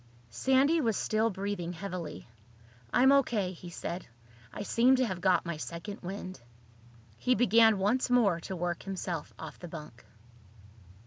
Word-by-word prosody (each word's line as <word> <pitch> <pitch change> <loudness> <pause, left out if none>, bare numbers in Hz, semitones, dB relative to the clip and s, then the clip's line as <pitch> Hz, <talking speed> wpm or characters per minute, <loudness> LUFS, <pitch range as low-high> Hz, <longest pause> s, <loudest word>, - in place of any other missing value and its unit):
Sandy 265 - +3
was 225 -6 +1
still 220 +1 +1
breathing 195 -3 -4
heavily. 175 - -6 0.6
"I'm 265 +2 +5
O.K.," 235 -9 +2
he 175 0 -10
said. 175 +1 -6 0.4
"I 205 - -5
seem 245 +5 +4
to 255 0 +2
have 185 -6 -4
got 185 -1 +3
my 170 -2 -3
second 170 +6 -7
wind." 185 -4 -7 0.8
He 250 - +2
began 225 -1 +5
once 215 +8 +1
more 220 -9 +3
to 190 +3 -6
work 175 -1 -2
himself 185 -5 -4
off - - -9
the 175 - -8
bunk. 150 -8 -10
195 Hz, 145 wpm, -30 LUFS, 175-230 Hz, 0.8 s, I'm